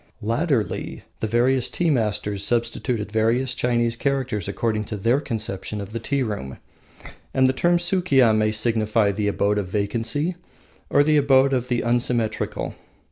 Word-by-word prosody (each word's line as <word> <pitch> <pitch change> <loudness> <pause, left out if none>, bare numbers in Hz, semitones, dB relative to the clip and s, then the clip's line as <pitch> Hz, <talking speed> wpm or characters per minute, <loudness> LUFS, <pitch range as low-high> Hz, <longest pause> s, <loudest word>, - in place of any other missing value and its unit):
Latterly 115 - -1 0.2
the 110 - -1
various 120 +3 +2
tea 170 -2 0
masters 105 -5 -1
substituted 115 0 -1
various 115 +4 +1
Chinese 120 -1 0
characters 130 -7 -2
according 105 +1 -1
to 105 - -5
their 115 +7 +2
conception 110 -5 -4
of 100 +1 -7
the 115 - -3
tea 140 +4 -1
room, 100 - -5 0.8
and 130 - +4
the 130 - +3
term 175 +5 +2
Sukiya 170 - +3
may 110 0 +2
signify 110 -1 +1
the 105 +1 -2
Abode 105 0 +1
of 100 - -3
Vacancy 115 - -1 0.5
or 145 - +4
the 155 +1 +3
Abode 135 -1 +4
of 125 -1 0
the 120 -2 0
Unsymmetrical. 120 -1 -1
115 Hz, 150 wpm, -23 LUFS, 105-130 Hz, 0.8 s, and